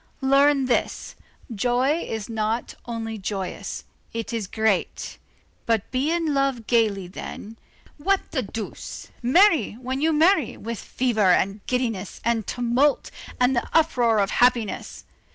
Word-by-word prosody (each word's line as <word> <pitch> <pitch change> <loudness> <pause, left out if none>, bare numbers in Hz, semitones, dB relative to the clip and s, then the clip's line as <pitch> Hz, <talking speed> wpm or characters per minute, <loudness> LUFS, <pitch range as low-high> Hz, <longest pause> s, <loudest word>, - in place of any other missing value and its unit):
Learn 275 +1 +4
this: 250 - -1 0.4
joy 250 +8 +1
is 220 -9 -4
not 225 +1 -2
only 225 -2 -4
joyous; 190 -1 -4 0.3
it 230 0 -4
is 220 -4 -2
great. 220 -2 -1 0.5
But 225 -3 0
be 265 +4 0
in 330 -2 0
love 275 -4 0
gayly 210 -6 +1
then, 210 +4 -8 0.4
what 390 +6 +1
the 265 - 0
deuce! 220 -1 -7
marry, 315 - +4
when 255 +4 -4
you 320 +1 +3
marry, 320 - +3
with 230 0 -5
fever 225 -6 +1
and 195 +3 +1
giddiness, 230 -7 -2
and 230 -2 0
tumult, 245 +4 +1 0.3
and 250 +1 +3
the 240 - -1
uproar 245 -8 +3
of 200 -1 +1
happiness! 240 -4 +1
235 Hz, 135 wpm, -24 LUFS, 220-275 Hz, 0.5 s, Learn